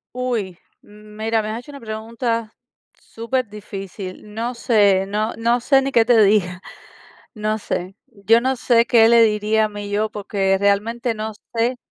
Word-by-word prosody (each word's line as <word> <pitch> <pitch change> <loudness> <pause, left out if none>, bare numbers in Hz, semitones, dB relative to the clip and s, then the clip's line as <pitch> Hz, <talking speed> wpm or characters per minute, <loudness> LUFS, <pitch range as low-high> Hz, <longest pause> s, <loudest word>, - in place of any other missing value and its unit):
Uy, 230 -8 -3 0.2
mm, 210 0 -16
mira, 220 0 0
me 215 - -4
has 225 +2 -4
hecho 290 - -12
una 280 - -10
pregunta 230 0 -4 0.5
superdifícil. 210 -4 -6
No 235 +3 -3
sé, 205 -5 +3
no 215 +3 -2
no 235 +2 +1
sé 270 +2 +3
ni 275 - -2
qué 230 -3 +5
te 235 0 +4
diga, 190 -3 +2 0.7
no 215 -1 -2
sé. 190 -3 -4
Yo 225 +1 +2
no 260 +1 0
sé 235 -1 +3
qué 230 -2 +5
le 235 0 +6
diría 215 0 +2
a - - -4
mi 205 -1 -7
yo, 210 +2 0
porque 195 -2 0
realmente 215 +5 0
no 220 0 -5 0.2
sé 235 +2 +1
220 Hz, 165 wpm, -20 LUFS, 205-235 Hz, 0.7 s, le